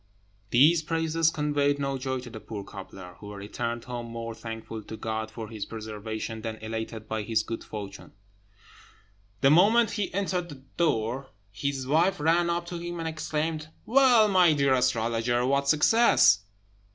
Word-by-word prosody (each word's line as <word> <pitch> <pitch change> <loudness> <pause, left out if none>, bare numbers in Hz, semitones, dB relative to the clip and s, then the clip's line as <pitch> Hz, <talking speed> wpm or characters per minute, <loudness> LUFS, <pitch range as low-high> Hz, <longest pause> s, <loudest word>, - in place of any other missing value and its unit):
These 155 +8 +5
praises 165 0 +1
conveyed 145 -2 +1
no 140 -1 -2
joy 130 0 -3
to 125 -1 -10
the 110 - -8
poor 105 -2 -7
cobbler, 95 -2 -10
who 105 -1 -9
returned 115 +4 -4
home 120 -2 -6
more 115 0 -6
thankful 115 0 -7
to 110 +1 -9
God 110 0 -3
for 110 0 -7
his 110 -2 -6
preservation 110 0 -6
than 110 0 -4
elated 110 0 -6
by 110 0 -2
his 110 +1 0
good 115 +1 -5
fortune. 105 -2 -8 1.3
The 135 - +5
moment 210 +7 +5
he 205 -2 -2
entered 185 -2 -2
the 135 -3 -11
door 130 -5 0 0.2
his 135 +5 -3
wife 160 +7 +2
ran 170 +3 +2
up 170 0 -1
to 175 - -5
him 175 0 -5
and 165 -1 -3
exclaimed, 155 0 -3 0.2
"Well, 245 -3 +5
my 180 -5 +5
dear 140 -2 +2
astrologer! 120 0 +1
what 140 +1 +1
success?" 155 - +5
130 Hz, 160 wpm, -27 LUFS, 110-165 Hz, 1.3 s, These